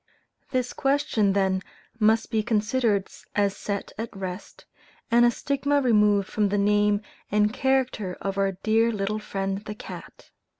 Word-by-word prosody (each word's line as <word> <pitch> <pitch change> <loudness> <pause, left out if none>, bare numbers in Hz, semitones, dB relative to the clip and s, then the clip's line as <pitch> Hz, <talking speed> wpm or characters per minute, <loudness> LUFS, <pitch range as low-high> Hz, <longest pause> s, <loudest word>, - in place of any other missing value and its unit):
This 255 -2 -1
question 270 -8 +1
then 190 -1 +1 0.4
must 220 +1 +3
be 220 - +2
considered 215 -1 +1 0.3
as 200 -1 +2
set 200 -1 -4
at 225 -3 -5
rest, 185 0 -7 0.5
and 240 +1 +6
a - - +6
stigma 280 +3 0
removed 210 -6 +3
from 210 -2 0
the 205 - 0
name 205 +1 +2 0.3
and 210 +1 +2
character 260 -8 0
of 195 0 -3
our 195 0 +1
dear 220 +4 +2
little 210 0 -2
friend 195 -2 -3
the 210 - -6
cat. 220 - -11
210 Hz, 145 wpm, -25 LUFS, 200-235 Hz, 0.5 s, and